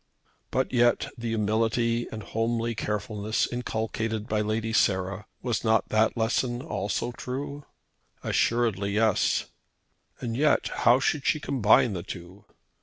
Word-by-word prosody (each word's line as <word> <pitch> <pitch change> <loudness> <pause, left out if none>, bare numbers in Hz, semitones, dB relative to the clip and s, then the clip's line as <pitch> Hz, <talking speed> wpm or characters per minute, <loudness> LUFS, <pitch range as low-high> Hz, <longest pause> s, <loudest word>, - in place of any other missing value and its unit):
But 130 +1 -1
yet 120 -1 +3
the 120 0 -5
humility 115 +2 +1
and 110 -1 -6
homely 115 +2 -1
carefulness 105 0 -1
inculcated 110 -2 -2
by 105 -3 0
Lady 110 +1 -1
Sarah, 95 0 +1 0.2
was 120 -3 -1
not 110 -1 +2
that 110 +2 +2
lesson 120 +2 0
also 120 -5 -2
true? 140 +4 -6 0.6
Assuredly 110 -4 +1
yes! 110 -1 +2 0.7
And 115 -2 -3
yet 150 +4 +2
how 120 +2 +4
should 140 +1 0
she 155 - +2
combine 120 -5 +3
the 90 - -3
two? 90 +3 -9
115 Hz, 125 wpm, -27 LUFS, 105-120 Hz, 0.7 s, how